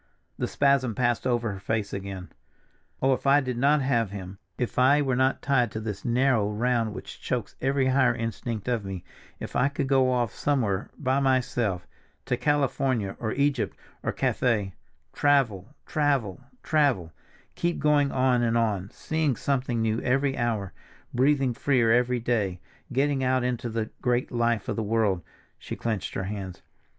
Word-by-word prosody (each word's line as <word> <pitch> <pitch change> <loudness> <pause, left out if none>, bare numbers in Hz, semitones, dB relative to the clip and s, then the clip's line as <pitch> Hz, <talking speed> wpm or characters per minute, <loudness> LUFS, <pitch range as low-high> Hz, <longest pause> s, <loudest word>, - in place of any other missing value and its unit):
The - - 0
spasm 140 -5 +2
passed 120 0 +1
over 120 -3 0
her 100 - -6
face 105 +1 -2
again. 95 -2 -6 0.7
"Oh, 135 0 +5
if 130 - -3
I 140 +1 +6
did 130 -3 -3
not 145 +2 +3
have 120 -5 +1
him, 95 -1 -8 0.2
if 125 0 -2
I 135 +3 +5
were 130 -2 0
not 130 +1 +1
tied 135 -4 +2
to 110 - -3
this 105 -2 -5
narrow 120 -3 +2
round 115 0 0
which - - -9
chokes - - -3
every 135 0 +1
higher 130 -2 +3
instinct 115 -1 -4
of 120 -4 0
me, 95 -2 -6 0.4
if - - -7
I 130 - +3
could 140 0 -2
go 130 -1 +3
off 120 -4 0
somewhere 110 -9 0
by 130 -1 +1
myself, 125 -8 0 0.4
to 125 - 0
California 130 -5 0
or 110 -2 -2
Egypt, 140 -3 0 0.2
or - - -1
Cathay—travel, 115 - 0 0.2
travel, 140 -11 0 0.2
travel, 135 - +1 0.4
keep 170 0 -1
going 145 -2 +3
on 130 -2 +2
and 115 -1 +2
on, 105 -4 0
seeing 155 -1 -1
something 125 -3 -1
new 110 +1 0
every 135 +2 +1
hour, 110 -6 -1 0.4
breathing 135 0 +2
freer 125 -2 +2
every 125 +1 +3
day, 105 -6 -1 0.3
getting 135 +1 +1
out 130 0 +2
into 125 -1 -2
the 110 -1 -3
great 125 0 0
life 120 -3 0
of - - -1
the 115 - -1
world!" 105 -4 +1 0.4
She - - -6
clenched 110 -4 -3
her - - -1
hands. 95 -2 -6
120 Hz, 160 wpm, -26 LUFS, 110-135 Hz, 0.7 s, I